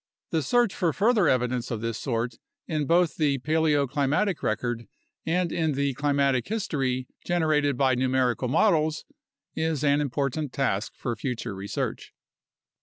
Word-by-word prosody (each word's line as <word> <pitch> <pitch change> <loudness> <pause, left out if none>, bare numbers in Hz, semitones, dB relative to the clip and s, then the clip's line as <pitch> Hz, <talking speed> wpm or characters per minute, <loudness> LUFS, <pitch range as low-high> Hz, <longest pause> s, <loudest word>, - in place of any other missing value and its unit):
The 160 - +1
search 240 - +2
for 170 -5 0
further 210 -3 +3
evidence 125 -2 +1
of 115 -3 -3
this 115 -1 -2
sort 120 -2 -2 0.3
in 150 -3 -2
both 170 0 +3
the 145 -3 +2
paleoclimatic 150 +4 +1
record 115 0 -2 0.4
and 175 0 +1
in 160 -3 0
the 140 0 0
climatic 140 -2 +1
history 135 - -1 0.2
generated 155 -5 +1
by 130 -1 +3
numerical 130 0 +1
models 155 - +2 0.5
is 160 -2 -1
an 145 0 +3
important 140 +1 -2
task 115 -7 -1
for 120 -2 -3
future 120 -1 -4
research. 95 +1 -4
140 Hz, 135 wpm, -26 LUFS, 125-160 Hz, 0.5 s, further